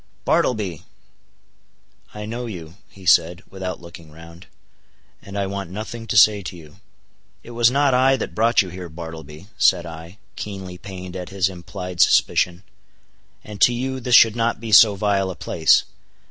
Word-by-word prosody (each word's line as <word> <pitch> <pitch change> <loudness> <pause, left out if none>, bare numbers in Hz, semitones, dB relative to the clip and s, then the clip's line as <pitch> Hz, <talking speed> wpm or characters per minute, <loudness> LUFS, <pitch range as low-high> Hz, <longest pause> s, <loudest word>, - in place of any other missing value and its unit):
"Bartleby!" 100 - 0 1.3
"I 105 0 -8
know 120 +3 -5
you," 85 -7 -8 0.2
he 95 -1 -16
said, 85 +1 +3
without 95 -2 -5
looking 85 -2 -13
round,—"and 85 +4 -16
I 100 - -1
want 100 -2 -5
nothing 110 +4 -7
to 105 - -1
say 105 0 +6
to 90 -1 -8
you." 75 0 -15 0.7
"It 120 - -12
was 120 0 +3
not 140 +1 +2
I 130 +1 +3
that - - -5
brought 115 0 +3
you 95 - -8
here, 90 0 -8
Bartleby," 80 0 -10
said 90 -2 +3
I, 85 +3 -10 0.2
keenly 95 -3 -7
pained 95 -2 -9
at 90 -1 -6
his 95 -2 0
implied 90 0 -6
suspicion. 90 +1 +2 0.8
"And 105 -1 -11
to 120 - +5
you, 130 +2 -3
this 125 0 +2
should 115 -2 +6
not 115 -1 -1
be 115 0 -7
so 105 0 +7
vile 100 -1 0
a 95 - -6
place. 80 0 +2
95 Hz, 160 wpm, -21 LUFS, 85-110 Hz, 1.3 s, so